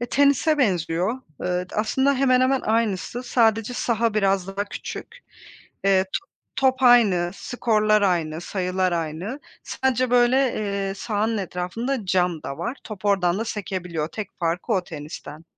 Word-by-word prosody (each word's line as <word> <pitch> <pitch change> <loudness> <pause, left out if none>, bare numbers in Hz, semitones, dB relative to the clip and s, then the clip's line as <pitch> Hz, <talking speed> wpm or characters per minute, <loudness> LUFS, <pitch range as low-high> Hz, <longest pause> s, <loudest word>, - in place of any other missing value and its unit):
Eee, 240 - -2
tenise 285 +2 +3
benziyor. 180 - +1 0.3
Iıı, 180 0 -2
d - - -10
aslında 265 +6 +2
hemen 255 -1 +3
hemen 260 +1 +3
aynısı. 220 0 -1
Sadece 225 -1 +2
saha 230 -2 0
biraz 195 -3 +2
daha 195 +1 -3
küçük. 465 - -8 0.7
Eee, 190 -1 +4
to 390 - -3 0.3
top 265 0 +2
aynı, 210 -9 +5
skorlar 215 -3 +1
aynı, 165 -4 0
sayılar 185 0 -1
aynı. 170 - -3 0.2
Sadece, 255 -1 0
böyle, 245 +1 +4 0.2
eee, 200 -2 -2
sahanın 220 +1 -1
etrafında 200 +6 -3
cam 180 -3 +1
da 140 - -6
var. 205 +10 -3
Top 210 -2 -9
oradan 190 -3 +2
da 225 - -1
sekebiliyor. 180 -7 -3
Tek 215 +2 -6
farkı 170 +7 -1
o 185 -3 +1
tenisten. 155 0 -9
205 Hz, 145 wpm, -23 LUFS, 180-240 Hz, 0.7 s, aynı